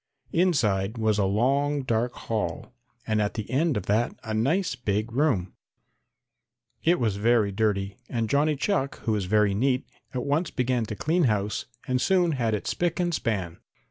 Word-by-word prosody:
Inside 110 - +2
was 110 -2 +1
a 100 - +3
long 135 +8 +1
dark 120 0 0
hall 115 +2 -4 0.3
and 110 -1 +1
at 105 - -1
the 110 - -4
end 145 0 +2
of 100 - -4
that 110 +4 +1
a 110 - -4
nice 140 - +1
big 110 -2 -2
room. 120 - +1 1.3
It 175 +2 +3
was 110 -5 0
very 110 -1 +3
dirty, 100 -1 0
and 115 -2 -1
Johnny 145 +4 +2
Chuck, 140 -2 -1
who 110 -2 0
is 100 -3 -1
very 105 +1 +3
neat, 130 +5 +1 0.3
at 125 -3 -3
once 150 +5 +1
began 125 -2 0
to 105 - -5
clean 165 - +1
house 105 -3 0 0.2
and 130 0 +1
soon 180 -3 +3
had 115 -6 0
it 100 - -5
spick 175 0 -1
and 175 -1 0
span. 95 - -2
115 Hz, 175 wpm, -26 LUFS, 105-140 Hz, 1.3 s, a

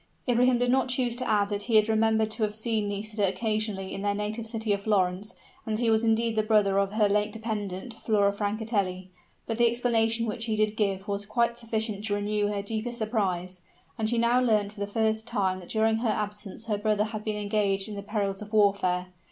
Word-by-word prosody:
Ibrahim 245 +1 +4
did 245 0 +1
not 265 0 +2
choose 245 -2 0
to 255 -1 -3
add 205 -2 +2
that 205 0 -2
he 230 - +1
had 215 0 +6
remembered 220 0 +2
to 220 - -4
have 210 -1 0
seen 220 -1 0
Nisida 205 0 -1
occasionally 215 -1 -1
in 195 - -5
their 205 0 0
native 215 +2 -3
city 220 -2 -1
of 200 - -2
Florence, 200 -1 0 0.3
and 215 -1 -2
that 240 - -2
he 230 - +3
was 220 +1 +3
indeed 225 0 +2
the 215 - +3
brother 210 -2 +3
of 200 0 0
her 215 -1 +3
late 210 +1 +1
dependent, 215 -1 -4
Flora 200 -2 +2
Francatelli. 205 -3 -2 0.3
But 225 0 -3
the 235 0 +6
explanation 230 -1 +1
which 225 +1 -3
he 220 -2 -1
did 215 0 +1
give 195 -2 -1
was 200 0 -2
quite 235 +2 +1
sufficient 220 -3 -3
to 205 -2 0
renew 205 0 0
her 205 -1 -2
deepest 225 +3 -2
surprise, 185 -5 -2 0.4
as 220 0 0
she 240 - 0
now 235 +2 +3
learnt 215 -4 +2
for 210 - -14
the 200 - -2
first 220 +1 0
time 190 -2 0
that 180 - -12
during 220 0 +2
her 230 0 0
absence 210 0 -4
her 210 -2 -1
brother 210 -1 +1
had 215 0 -5
been 215 -1 -2
engaged 205 -1 0
in 215 - -6
the 200 - -5
perils 200 -1 -2
of 210 +1 -9
warfare. 190 -4 +2
215 Hz, 220 wpm, -27 LUFS, 200-225 Hz, 0.4 s, had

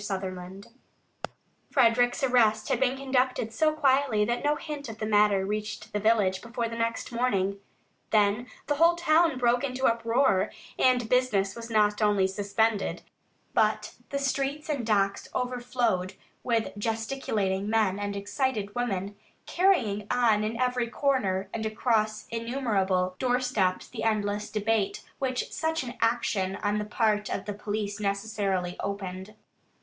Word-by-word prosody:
SUTHERLAND 190 -1 -5 1.0
Frederick's 245 -1 +3
arrest 225 -4 +3
had - - +1
been 265 0 +1
conducted 255 -4 0
so 310 +7 +3
quietly 270 -7 +2
that 240 +4 -1
no 295 +1 +2
hint 295 -4 -6
of 220 - -7
the 215 - -3
matter 205 -2 +3
reached 210 +2 -4
the 210 - 0
village 205 -3 +2
before 235 0 -3
the 230 - -6
next 230 +1 -2
morning. 200 -5 0 0.5
Then 210 +3 +2 0.2
the 290 - -1
whole 335 +2 +5
town 330 -3 +3
broke 245 0 +2
into 260 -1 -1
uproar, 230 -3 +2 0.3
and 250 -3 +3
business 220 -6 +1
was 230 0 -8
not 210 -1 +2
only 205 -2 +3
suspended, 200 +2 0 0.5
but - - +1 0.2
the 280 - -2
streets 280 +2 -2
and 280 -5 -1
docks 200 -2 +1
overflowed 245 -7 -1 0.3
with 230 -4 -1
gesticulating 215 -3 -1
men 215 -3 +2
and 205 0 -3
excited 205 0 -2
women, 205 -4 -2 0.3
carrying 240 - +1
on 225 -4 +3
in 225 +2 -3
every 250 -1 +1
corner 225 -8 0
and 225 - -3
across 215 -1 0
innumerable 210 -7 0
doorsteps 245 -7 0
the - - -7
endless 210 -1 0
debate 215 -1 0 0.2
which 255 -2 -2
such 320 -2 -1
an 240 -1 -6
action 225 -5 +1
on 205 0 +1
the 210 - -3
part 210 -1 0
of - - -3
the 205 - -3
police 205 0 -4
necessarily 200 -3 -1
opened. 200 0 -5
220 Hz, 140 wpm, -27 LUFS, 205-250 Hz, 1.0 s, whole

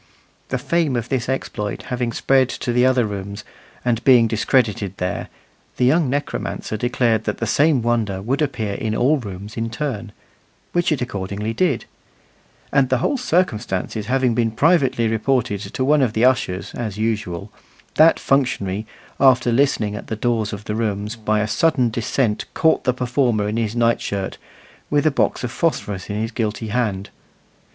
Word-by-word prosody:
The 130 - 0
fame 145 +2 0
of 120 -1 -2
this 130 -2 -1
exploit 105 -5 -3
having 120 -1 -1
spread 130 +2 +2
to 120 -1 -3
the 125 +1 +4
other 130 -2 +3
rooms, 100 +1 -5 0.4
and 115 -2 +1
being 125 -3 +6
discredited 110 -3 0
there, 90 0 -3 0.5
the 125 - +2
young 150 +2 +3
necromancer 145 -5 -3
declared 115 -1 +1
that 105 - -2
the 115 - -2
same 140 +2 +3
wonder 115 -5 0
would 125 +9 -1
appear 125 -8 -1
in 110 +2 -2
all 140 +7 +3
the 110 -5 -6
rooms 100 +4 -9
in 115 0 -1
turn, 115 -4 -4 0.6
which 175 -1 +1
it 140 -5 +1
accordingly 100 -1 -4
did; 175 +10 0 0.9
and 135 -2 +3
the 130 - +3
whole 210 - 0
circumstances 110 - -1
having 130 -1 +2
been 115 0 +1
privately 135 -2 +2
reported 110 -2 0
to 130 - -3
one 150 +1 +4
of 120 -5 +1
the 115 +2 +3
ushers 125 -8 +1
as 110 -4 -4
usual, 105 -4 -2 0.4
that 160 +2 +5
functionary, 110 -7 0 0.3
after 130 -3 +5
listening 115 -5 +2
about 105 - -5
at - - -20
the 110 - -3
doors 110 -1 0
of 100 0 -6
the 105 - -3
rooms, 105 -1 -2
by 110 -1 0
a 105 - 0
sudden 130 -2 +2
descent 115 -1 0
caught 160 -1 +2
the 125 - +4
performer 125 -4 0
in 105 +2 -2
his 115 -1 -1
night 115 0 +2
shirt, 100 -1 -4 0.5
with 145 +1 +2
a 155 - +4
box 135 - 0
of 120 - -2
phosphorus 105 - -2
in 105 - -3
his 110 +2 -2
guilty 110 -1 -3
hand. 105 -4 -1
115 Hz, 175 wpm, -21 LUFS, 105-130 Hz, 0.9 s, being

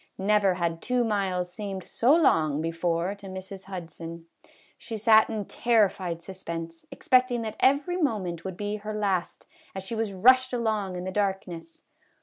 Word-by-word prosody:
Never 200 -1 +3
had 170 -2 -2
two 250 -1 +1
miles 190 -5 -1
seemed 195 -3 -5
so 255 +6 +3
long 155 - +3
before 165 +3 -1
to 200 -1 -12
Mrs. 190 +1 -8
Hudson. 170 -3 -8 0.5
She 225 - -6
sat 220 0 +5
in 215 -3 -3
terrified 190 -8 +1
suspense, 165 -3 -7
expecting 255 -2 +2
that 220 -1 -5
every 285 +7 +3
moment 200 - -1
would 190 -2 -6
be 205 0 -3
her 210 +1 -6
last, 195 -4 -1 0.3
as 190 - -4
she 190 - -5
was 225 -2 -1
rushed 255 +7 +4
along 215 -6 -1
in 180 - -4
the 185 - -4
darkness. 185 -4 -3
195 Hz, 155 wpm, -27 LUFS, 175-220 Hz, 0.5 s, sat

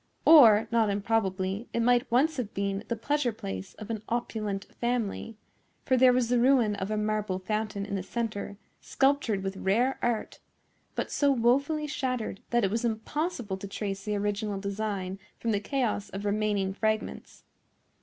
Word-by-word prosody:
Or, 230 -9 +8
not 225 -2 +3
improbably, 200 0 -1
it - - 0
might 245 +2 +3
once 290 +6 +3
have 230 -5 -4
been 200 0 -1
the 235 - -1
pleasure 275 +2 0
place 95 - -7
of 215 +1 -7
an 220 -2 -3
opulent 215 -4 -2
family; 230 -2 -2 0.5
for 260 - +3
there 255 0 +6
was 245 -2 +1
the 245 0 +3
ruin 245 -4 +4
of 190 0 -3
a 215 - -1
marble 210 -2 -1
fountain 210 +1 -2
in 200 - -6
the 195 - -1
centre, 205 -1 -4 0.2
sculptured 270 -8 +1
with 195 0 -3
rare 235 +9 +1
art, 235 -2 -1 0.6
but - - -3
so 285 -1 +3
wofully 275 +5 +2
shattered 255 -8 -3
that 240 -1 +2
it 195 - +1
was 225 +2 -1
impossible 235 - -2
to 200 - -7
trace 195 -1 -4
the 210 0 -2
original 205 0 -1
design 200 -2 -3 0.2
from 230 - -1
the 205 - +1
chaos 215 -3 -1
of 195 +1 -6
remaining 205 -2 0
fragments. 215 +1 -3
215 Hz, 165 wpm, -28 LUFS, 200-245 Hz, 0.6 s, Or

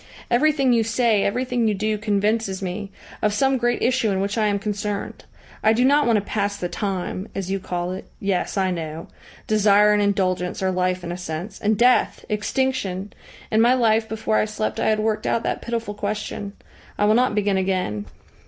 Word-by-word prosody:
"Everything 270 0 +3
you 230 -1 +3
say, 225 -2 +2
everything 245 +2 0
you 210 - +1
do, 215 +2 0
convinces 210 -1 0
me 195 +2 -4 0.3
of 210 -1 +1
some 265 +3 +2
great 240 0 0
issue 250 -2 +2
in 190 -1 0
which 200 +1 -1
I 220 -2 +2
am 205 -1 +1
concerned. 205 0 -4 0.4
I 220 - +5
do 245 +3 +2
not 290 +1 +4
want 230 -2 +4
to 205 - -2
pass 205 -1 -1
the 175 - -3
time, 190 0 -3
as 190 -1 -3
you 195 - 0
call 180 -1 -3
it. 185 +2 -6
Yes, 195 +1 -1
I 190 -1 +2
know. 165 -2 -5 0.4
Desire 210 -1 +4
and 210 - +2
indulgence 185 -2 0
are 190 - +2
life 185 0 0
in 175 - -4
a 175 - -4
sense 180 +3 -6
and 210 0 +2
Death! 245 +3 +3
Extinction! 210 -3 -1 0.4
In 220 0 +4
my 240 +2 +5
life 225 -2 +2
before 220 0 0
I - - +3
slept 215 0 -3
I - - +2
had 215 - +2
worked 215 0 -1
out 230 - +1
that - - -2
pitiful 230 -3 -3
question. 205 -1 -4 0.4
I 205 - +2
will 210 - +4
not 245 -1 +2
begin 205 -2 +1
again. 185 - -1
210 Hz, 200 wpm, -22 LUFS, 190-225 Hz, 0.4 s, I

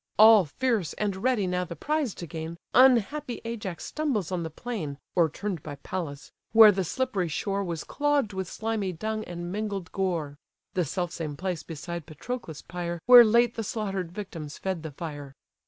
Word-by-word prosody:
All 215 -3 +8
fierce, 205 - -1
and 205 -2 -2
ready 235 -1 +1
now 180 0 0
the 170 -1 -7
prize 295 - -1
to 175 - -6
gain, 165 0 -6 0.2
Unhappy 255 +1 +4
Ajax 205 -7 -5
stumbles 255 - -1
on 180 -2 -1
the 165 - -3
plain 160 -6 -5 0.2
(O'erturn'd 175 +1 0
by 145 -1 -7
Pallas), 145 -2 -6 0.2
where 220 -1 +10
the 190 -1 -1
slippery 210 -2 -1
shore 195 +5 -1
Was 170 -4 -4
clogg'd 290 -7 0
with 190 -1 -3
slimy 220 -2 -2
dung 215 +5 -3
and 175 0 -6
mingled 200 -3 -3
gore. 165 -7 -2 0.3
(The 180 -2 +1
self 175 +3 -2
same 150 -3 -5
place 180 -3 -2
beside 165 +1 -6
Patroclus' 160 - -6
pyre, 175 0 -4
Where 245 -1 +11
late 235 +1 +4
the 225 - -3
slaughter'd 195 -5 -3
victims 170 -7 -7
fed 190 -3 -3
the 160 - -5
fire.) 145 -2 -7
185 Hz, 170 wpm, -27 LUFS, 165-220 Hz, 0.3 s, Where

